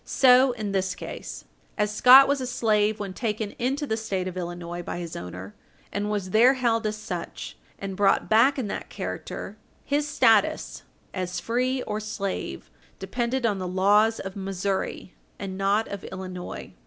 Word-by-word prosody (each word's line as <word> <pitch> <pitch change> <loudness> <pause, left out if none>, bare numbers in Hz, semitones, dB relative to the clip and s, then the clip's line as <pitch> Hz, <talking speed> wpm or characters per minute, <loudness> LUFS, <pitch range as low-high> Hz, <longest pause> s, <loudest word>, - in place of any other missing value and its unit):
So 255 0 +5
in 215 -4 -4
this 190 -1 -1
case. - - -8 0.3
As 210 0 0
Scott 260 +5 +8
was 280 -1 +1
a 255 - -3
slave 215 -3 +1
when 200 -2 -5
taken 215 -1 -2
into 270 +5 -1
the 220 - -1
State 195 -5 -3
of 185 - -5
Illinois 175 -1 -5
by 175 - -5
his 170 -2 -6
owner, 90 +3 -7 0.4
and 205 +1 -2
was 200 -3 -2
there 245 +6 +6
held 230 -3 +1
as 215 - -2
such, 180 -6 -6 0.2
and 195 -1 -5
brought 195 0 +2
back 235 +6 +4
in 260 - -1
that 205 - -5
character, - - -6 0.3
his 290 +1 0
status 240 -6 +2 0.3
as 180 -1 -3
free 255 +2 -1
or 210 0 -3
slave 195 - -5 0.3
depended 240 +5 -2
on 205 -4 +1
the 185 - -3
laws 205 +5 +3
of 195 -1 -6
Missouri, 195 -1 -3 0.2
and 195 -2 -5
not 200 +3 +1
of 200 -1 -6
Illinois. 185 -1 -7
210 Hz, 165 wpm, -25 LUFS, 190-235 Hz, 0.4 s, Scott